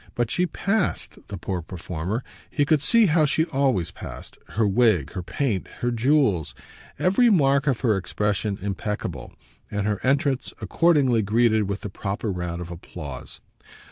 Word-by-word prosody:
But 120 -1 0
she 180 0 +1
PASSED, 200 +4 -2
the 100 - -6
poor 90 0 -3
performer 90 +6 -4 0.3
he 145 - +1
could 150 -1 +3
see 225 +10 +5
how 160 -3 +4
she 160 +2 +2
always 135 - 0
passed; - - -9 0.2
her 110 -2 +3
wig, 100 - +3
her 90 - -4
paint, 105 +1 -2
her 120 - +1
jewels, 120 - +2 0.4
every 195 +7 +4
mark 140 -7 +3
of 130 -5 +1
her 115 -5 +3
expression 100 +2 -1
impeccable, 100 - -4 0.4
and 105 -1 -2
her 105 -1 0
entrance 140 0 +1
accordingly 145 -9 +3
greeted 110 0 +2
with 100 0 -3
the 105 - -5
proper 100 +2 -3
round 90 -1 -4
of 90 0 -7
applause. 75 -6 -8
110 Hz, 155 wpm, -24 LUFS, 95-140 Hz, 0.4 s, see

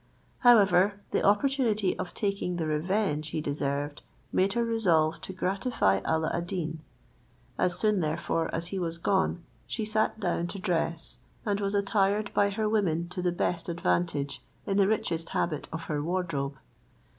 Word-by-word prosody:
However, 200 -4 +5
the - - +1
opportunity 215 -2 +2
of 175 - -5
taking 200 -3 -1
the 165 -2 -1
revenge 155 0 0
he 155 - -3
deserved 145 0 -2 0.3
made 195 +1 +2
her 235 0 +1
resolve 170 -9 +2
to - - -6
gratify 185 - +1
Alla 160 0 +1
ad 170 0 -2
Deen. 165 -4 -3 0.8
As 180 -1 +2
soon, 210 -2 +2
therefore, 160 0 -1
as 165 +1 -3
he 195 - -1
was 165 -2 -2
gone, 190 -1 +1 0.2
she 220 - -2
sat 215 +1 0
down 175 -3 0
to 195 - -6
dress, 170 -3 -1 0.3
and 205 -2 0
was 200 0 0
attired 200 +1 +1
by 200 0 +3
her 215 +2 -1
women 170 -6 +1
to 180 0 -4
the 180 0 +1
best 175 +1 -1
advantage 140 - 0 0.2
in 195 -2 0
the 195 -1 +5
richest 165 -6 -1
habit 155 -4 -1
of 160 - -4
her 150 -2 -2
wardrobe. 155 -5 -2
180 Hz, 160 wpm, -28 LUFS, 160-205 Hz, 0.8 s, However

